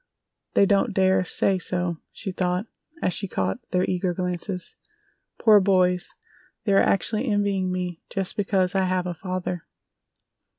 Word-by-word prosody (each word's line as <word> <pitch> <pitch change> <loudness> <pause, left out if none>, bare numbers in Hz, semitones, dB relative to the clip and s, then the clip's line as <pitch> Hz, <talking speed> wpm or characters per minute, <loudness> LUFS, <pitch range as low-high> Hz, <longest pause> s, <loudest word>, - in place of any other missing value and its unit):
"They 200 - +6
don't 200 +2 +2
dare 190 -1 +3
say 190 +1 +1
so," 175 -1 -1
she 195 - -5
thought, 180 +2 -1 0.4
as 180 - +1
she 200 - -1
caught 95 - -1
their 180 0 +1
eager 180 -1 -1
glances. 180 0 -4 0.6
"Poor 215 -2 +6
boys, 185 -2 +2 0.5
they 205 -2 +1
are 195 - +6
actually 215 +5 +1
envying 200 -3 +1
me 180 -2 -3
just 195 -2 -2
because 195 -2 +1
I 190 -1 +2
have 185 0 0
a 180 - -2
father!" 180 0 -4
185 Hz, 145 wpm, -25 LUFS, 180-195 Hz, 0.6 s, They